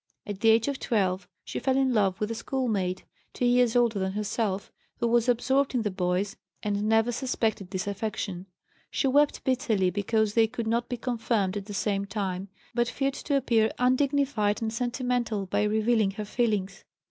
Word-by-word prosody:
At 205 -2 -5
the 225 - +4
age 225 +2 +4
of 280 -2 -2
12 190 -4 0 0.2
she - - -4
fell 265 0 +1
in 265 -2 +2
love 195 -4 +2
with 210 +1 -1
a - - 0
schoolmate, 220 -6 -2 0.3
two 250 - -1
years 245 -1 +3
older 235 -4 +3
than 190 0 -1
herself, 205 -1 -2 0.3
who 235 - 0
was 235 +1 +3
absorbed 265 +3 +2
in 240 - +1
the 210 - -1
boys 185 +1 -1 0.3
and 205 0 0
never 225 +2 +3
suspected 225 -6 -1
this 185 -1 -3
affection; 200 -2 -4 0.4
she - - -1
wept 290 +2 +3
bitterly 220 -8 +1
because 210 +1 0
they 225 0 +4
could 225 +1 -4
not 235 +2 0
be 245 - -2
confirmed 225 -5 -1
at 200 -1 -4
the 205 - -6
same 200 -1 0
time, 195 -2 -3 0.3
but 240 -1 +1
feared 270 +2 -1
to 285 0 -1
appear 230 -4 +2
undignified 255 -4 +2
and 225 -1 -2
sentimental 245 -3 -1
by 200 +2 0
revealing 215 0 +2
her 210 +2 -5
feelings. 205 -4 -1
220 Hz, 180 wpm, -27 LUFS, 200-245 Hz, 0.4 s, the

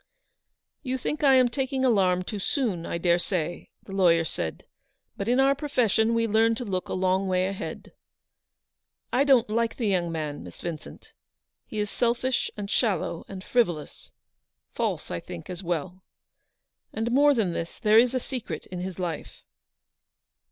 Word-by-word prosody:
"You 260 -2 -2
think 300 +5 -3
I 270 -2 +7
am 255 -1 +6
taking 265 +1 -1
alarm 185 -6 +3
too 205 +3 -5
soon, 195 - -1
I - - -2
daresay," 175 0 0 0.2
the - - -12
lawyer 170 -4 +4
said, 80 - -4 0.3
" - - -51
but 200 - -4
in 245 +2 +3
our 270 +1 +5
profession 230 -6 +1
we 230 0 +2
learn 225 +1 +3
to 245 - -4
look 185 -3 -3
a - - -2
long 190 +1 +1
way 185 0 +2
ahead. 195 0 -6 1.2
I 265 - +4
don't 265 -4 +5
like 230 +1 0
the 235 - -1
young 180 -4 +1
man, 155 -3 -4
Miss 90 -1 -11
Vincent. 165 -3 -7 0.5
He 215 - -7
is 210 -1 -1
selfish, 240 +1 0
and 205 -1 -4
shallow, 195 -7 0
and 190 -1 -8
frivolous, 175 -13 -1 0.3
— - - -58
false, - - -2
I 85 - -2
think, 85 - -8
as 180 0 -5
well. 180 +1 -3 0.9
And, 225 +2 -2
more 285 +3 +5
than 200 -7 +1
this, 165 0 -5
there 215 +1 +5
is 250 +2 +3
a - - +2
secret 235 - -5
in 180 - -4
his 185 -1 -5
life." 175 -4 -5
200 Hz, 170 wpm, -26 LUFS, 175-245 Hz, 1.2 s, I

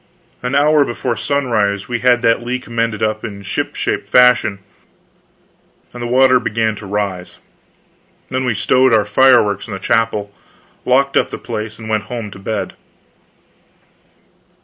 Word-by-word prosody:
An 125 +2 -2
hour 150 +1 +4
before 120 -1 -3
sunrise 115 -5 -1
we 120 -1 -2
had 120 0 +2
that 115 0 +3
leak 125 +1 -4
mended 115 -2 -2
in 110 -2 -3
ship 100 - -3
shape - - -2
fashion, 125 -5 +4 1.4
and 120 - -8
the 120 - -3
water 130 +1 +4
began 110 -2 -1
to 100 0 -9
rise. 95 -3 -4 0.9
Then 130 +1 -2
we 125 -4 0
stowed 125 +4 +3
our 105 -2 +2
fireworks 105 -3 +3
in 110 - -7
the - - -7
chapel, 105 -1 0 0.5
locked 135 +2 +2
up - - +2
the - - -6
place, 110 -2 -6
and 110 - -9
went 110 -2 -1
home 115 -2 -6
to 100 - -11
bed. 110 +2 -4
115 Hz, 150 wpm, -17 LUFS, 105-125 Hz, 1.4 s, hour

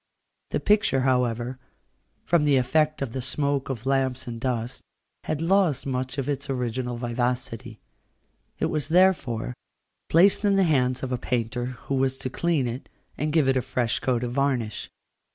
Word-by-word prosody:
The - - -1
picture, 205 -10 +3
however, 125 -1 0 0.7
from 170 -3 +3
the 145 -2 +4
effect 150 +4 +1
of 120 -4 -5
the 130 - -3
smoke 140 +1 -1
of 125 -2 -4
lamps 130 -1 0
and 115 -2 -6
dust, 125 -1 -2 0.4
had 155 +1 -2
lost 180 -5 +2
much 130 0 -3
of 135 - -2
its 145 -1 -3
original 125 -1 -2
vivacity. 120 -2 -3 0.8
It - - 0
was, 155 -4 -1
therefore, 155 -10 +2 0.6
placed 190 +6 +5
in 200 -1 +3
the 195 - +4
hands 130 -6 +1
of 130 - -3
a 125 - -1
painter, 120 0 -2 0.2
who - - -2
was 135 0 +1
to 130 - -5
clean 160 -4 +1
it, 120 +3 -6 0.3
and 150 +1 -1
give 155 -3 +3
it 135 - +3
a 130 - +2
fresh 120 -1 -1
coat 125 -2 0
of 120 - -2
varnish. 125 -5 -1
130 Hz, 170 wpm, -25 LUFS, 125-150 Hz, 0.8 s, placed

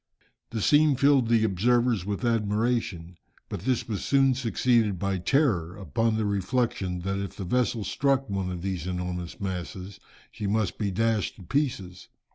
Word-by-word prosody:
The 110 -3 -3
scene 150 -1 +5
filled 140 -2 +4
the 115 -1 +3
observers 110 0 +2
with 105 +4 -2
admiration. 105 -6 -1 0.3
But 90 - -6
this 130 -3 0
was 105 -4 -3
soon 135 -1 +3
succeeded 115 -4 +1
by 95 +1 -1
terror, 95 - +1
upon 110 +5 0
the 110 - 0
reflection 100 -3 -1
that 95 +2 -2
if 100 -1 -5
the 100 - -5
vessel 120 +2 0
struck 135 +6 +1
one 95 -3 -2
of 90 -1 -6
these 95 -3 -3
enormous 90 -1 -4
masses, 95 0 -5 0.3
she 105 - -4
must 105 -1 0
be 105 -2 0
dashed 110 +1 0
to 95 - -13
pieces. 95 - -2
105 Hz, 160 wpm, -27 LUFS, 95-120 Hz, 0.3 s, scene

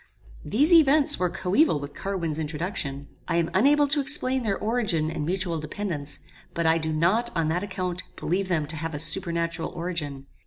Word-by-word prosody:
These 290 - +2
events 300 -3 +5
were 180 -1 +1
coeval 185 - +2
with 145 0 -8
Carwin's 170 -6 -3
introduction. 150 -3 -4 0.2
I 170 - -1
am 170 -1 0
unable 285 +8 +4
to 300 0 +1
explain 265 -2 +4
their 205 -4 -1
origin 210 -9 0
and 160 -2 -4
mutual 180 -2 -1
dependance; 155 -2 -4 0.4
but 170 - -1
I 160 +1 +3
do 160 0 -3
not, 185 +10 +1
on 165 -2 0
that 175 +4 -1
account, 185 -2 -3
believe 190 +3 -1
them 165 -5 0
to 155 +2 -3
have 160 0 -4
a - - -2
supernatural 170 +1 0
origin. 165 -6 -5
175 Hz, 180 wpm, -25 LUFS, 160-205 Hz, 0.4 s, events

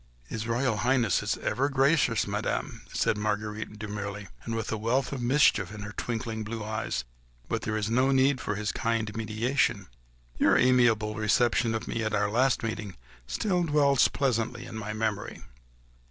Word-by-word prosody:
"His 110 - -5
Royal 120 -1 +1
Highness 120 -4 +2
is - - -1
ever 140 +3 0
gracious, 135 -4 +3
Madame," - - -3
said 105 - +1
Marguerite, 105 0 -3
demurely, 105 -1 -5 0.2
and 115 - -3
with 115 0 -3
a 110 - -1
wealth 120 +5 0
of 135 - -4
mischief 120 -7 +3
in 105 -1 -8
her 105 0 -6
twinkling 115 -1 -3
blue 110 0 -5
eyes, 110 0 -2 0.4
"but - - -2
here 110 - -1
there - - 0
is 110 +1 -2
no 130 +3 +3
need 135 0 +3
for 105 - -2
his 105 +1 -2
kind 115 -2 -1
mediation.... 110 -1 0 0.5
Your - - +5
amiable 120 -4 +3
reception 115 +2 +2
of 110 - -4
me 115 - -2
at 110 -1 0
our 105 0 +1
last 130 +3 +2
meeting 110 -4 -4 0.3
still 180 - 0
dwells 145 -4 +4
pleasantly 120 -2 -1
in 115 - -9
my 110 -1 -4
memory." 110 -1 -3
115 Hz, 170 wpm, -28 LUFS, 105-125 Hz, 0.5 s, Your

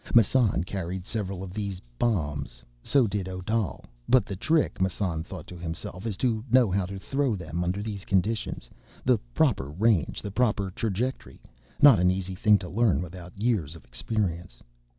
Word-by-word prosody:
Massan 115 -5 +4
carried 90 0 -4
several 95 -4 -3
of 90 -1 -7
these 100 -3 -3 0.2
"bombs"; 75 - -1 0.2
so 135 - +3
did 100 -3 -2
Odal. 95 +3 -2 0.2
But 130 -2 +5
the 100 - -5
trick, 155 - +1
Massan 90 -3 0
thought 85 0 -8
to 90 - -10
himself, 85 +3 -6
_is 105 -4 -2
to 115 -4 0
know 120 -4 +5
how 95 -1 +1
to 100 +1 -6
throw 135 +3 0
them 85 -1 -3
under 95 +3 -1
these 105 -3 -5
conditions; 100 - -1 0.4
the - - +4 0.2
proper 65 +1 +2
range, 95 +2 +1
the 100 - -4
proper 105 -4 +1
trajectory. 115 +6 -3 0.4
Not 140 -8 +9
an 90 0 +4
easy 95 0 -1
thing 105 +3 +4
to 95 - -7
learn, 95 - +2
without 90 +2 -10
years 100 - 0
of 80 - -14
experience. 85 - -3
95 Hz, 170 wpm, -27 LUFS, 90-110 Hz, 0.4 s, Not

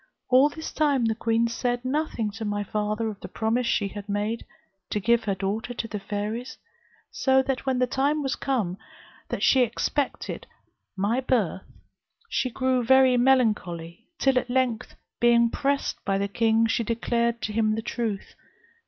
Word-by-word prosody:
All 260 +3 +6
this 315 +1 -7
time 285 -6 +2
the 225 - +2
queen 230 +1 +1
said 245 +1 -2
nothing 255 -6 -1
to 225 +2 -7
my 205 -1 -1
father 210 +2 -2
of 210 -2 -5
the - - -8
promise 230 +2 -1
she 200 -3 +1
had 205 +1 -9
made, 210 +3 -1 0.5
to 210 - -1
give 235 +3 +2
her 200 -2 0
daughter 205 +5 -3
to 230 - -3
the 210 -2 -5
fairies; 210 +5 -4 0.5
so 265 -1 +3
that, 270 0 -3
when 260 -1 +2
the 250 - +3
time 285 +4 0
was 270 - -1
come 210 -10 -1 0.5
that - - -3
she 260 - +5
expected 250 +4 -2 0.5
my 205 +6 +1
birth, 220 -8 0 0.6
she 255 - 0
grew 255 0 0
very 260 +1 +5
melancholy; 220 -8 +1
till 270 -2 +3
at 250 - -8
length, 250 -3 0 0.2
being 235 -1 +4
pressed 280 0 -1
by 195 0 0
the 200 0 0
king, 225 +2 +2
she 225 +1 +1
declared 235 +1 0
to 210 - -2
him 215 -1 +2
the 225 - -4
truth. 220 -5 -3
235 Hz, 170 wpm, -26 LUFS, 210-255 Hz, 0.6 s, All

